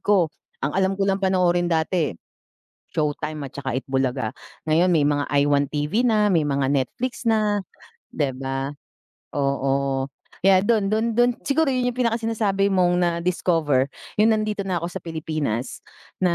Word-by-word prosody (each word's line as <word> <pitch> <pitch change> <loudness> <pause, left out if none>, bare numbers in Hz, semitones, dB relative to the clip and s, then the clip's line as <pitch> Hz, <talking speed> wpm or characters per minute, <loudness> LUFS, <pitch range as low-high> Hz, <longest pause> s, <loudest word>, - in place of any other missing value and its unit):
ko. 185 -6 +2 0.3
Ang 145 - -1
alam 190 +1 +2
ko 195 - +1
lang 195 0 +1
panoorin 180 -2 +2
dati, 160 - 0 0.7
Showtime 150 0 -2
at - - -12
saka 135 -3 -3
Eat 130 - -3
Bulaga. 130 -4 -1 0.3
Ngayon 165 +4 +3
may 155 -4 +3
mga 145 -1 +1 0.2
iWant 145 -1 +2
TV 150 +9 0
na, 215 -4 +3
may 165 - +4
mga 140 -1 +1
Netflix 235 - -2
na, 210 -2 +2 0.5
'di 135 -4 -1
ba? 135 0 -3 0.7
Oo, 135 -1 0 0.4
kaya 190 -1 +6
do'n 205 -1 +1
do'n 220 +1 +1
do'n 240 +1 +4 0.2
siguro 285 +1 +2
'yon 250 -1 0
yung - - -20
pinaka-sinasabi 225 -4 +1
mong 180 -2 +3
na-discover, 170 -5 +1 0.3
yung 220 +1 +5
nandito 210 -2 -2
na 180 -3 -1
ako 170 - -1
sa - - -5
Pilipinas 155 -7 -3 0.4
na, 180 -2 +3
175 Hz, 155 wpm, -23 LUFS, 140-205 Hz, 0.7 s, kaya